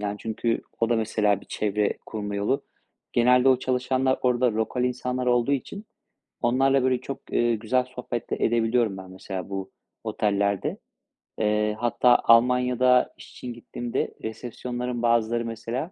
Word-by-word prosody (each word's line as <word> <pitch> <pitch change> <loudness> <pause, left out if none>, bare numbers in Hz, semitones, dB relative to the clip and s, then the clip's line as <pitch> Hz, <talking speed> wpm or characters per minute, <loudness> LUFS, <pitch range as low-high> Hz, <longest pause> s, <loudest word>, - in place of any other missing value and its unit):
Yani, 105 0 -2
çünkü 115 +1 -2 0.2
o 115 - +2
da, 120 - +2
mesela, 105 -2 +1
bir - - -17
çevre 105 0 -1
kurma 105 -2 -4
yolu. 105 +7 0 0.5
Genelde 125 +2 +4
o 130 - +5
çalışanlar 130 +1 0
orada 125 -1 +2
lokal 110 +3 -1
insanlar 125 0 -2
olduğu 120 +2 +2
için 195 - -3 0.6
onlarla, 135 +3 +3
böyle, 130 -1 +1
çok, 135 +1 -6
eee, 120 0 +2
güzel 125 +4 +1
sohbet 125 -2 -6
de - - 0
edebiliyorum 115 -2 +2
ben, 95 -1 -10
mesela, 95 0 -6
bu 95 -1 -4 0.3
otellerde. 100 -1 0 0.6
Eee, 105 0 +1
hatta 120 +1 +4
Almanya'da 125 +1 +4
iş - - -13
için 125 -1 -7
gittiğimde 120 0 -4
resepsiyonların 120 +2 -4
bazıları, 115 0 +2
mesela, 115 +8 -4
120 Hz, 145 wpm, -25 LUFS, 110-125 Hz, 0.6 s, o